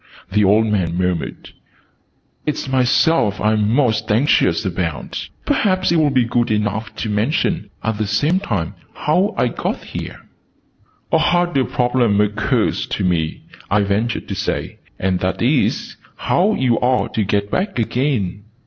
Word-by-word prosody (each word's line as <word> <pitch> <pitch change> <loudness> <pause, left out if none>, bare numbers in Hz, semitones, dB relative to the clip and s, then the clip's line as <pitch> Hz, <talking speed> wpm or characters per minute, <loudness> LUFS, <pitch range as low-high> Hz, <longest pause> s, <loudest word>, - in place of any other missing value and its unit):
the 105 +1 +3
old 105 +3 +4
man 90 -6 0
murmured. 90 -5 -2 1.0
"Its 150 -2 -2
myself 130 - +2
I'm 105 -1 +2
most 120 -5 +1
anxious 110 - +2
about. 85 -4 -1
And - - -7 0.2
perhaps 185 -3 +1
you'll 160 -3 +3
be 130 -3 +2
good 120 +1 0
enough 110 +1 -1
to - - -3
mention, 125 - 0
at 110 -1 -2
the 110 - 0
same 145 - +2
time, 95 - -2 0.2
how 180 +7 +1
I - - +2
got - - -3
here?" - - -7 0.9
"A - - +4
harder 175 -6 +2
problem 120 -4 +1
occurs 105 0 0
to - - -3
me," 85 -4 -1 0.3
I 100 +1 +3
ventured 105 +4 -1
to - - -2
say: - - -3 0.2
"and 95 -1 0
that 95 +1 -1
is, 130 +4 +1 0.2
how 200 +5 +1
you're 125 0 +1
to 110 - +1
get 100 +1 -1
back 195 -2 -1
again." 115 -5 -1
110 Hz, 145 wpm, -19 LUFS, 100-135 Hz, 1.0 s, old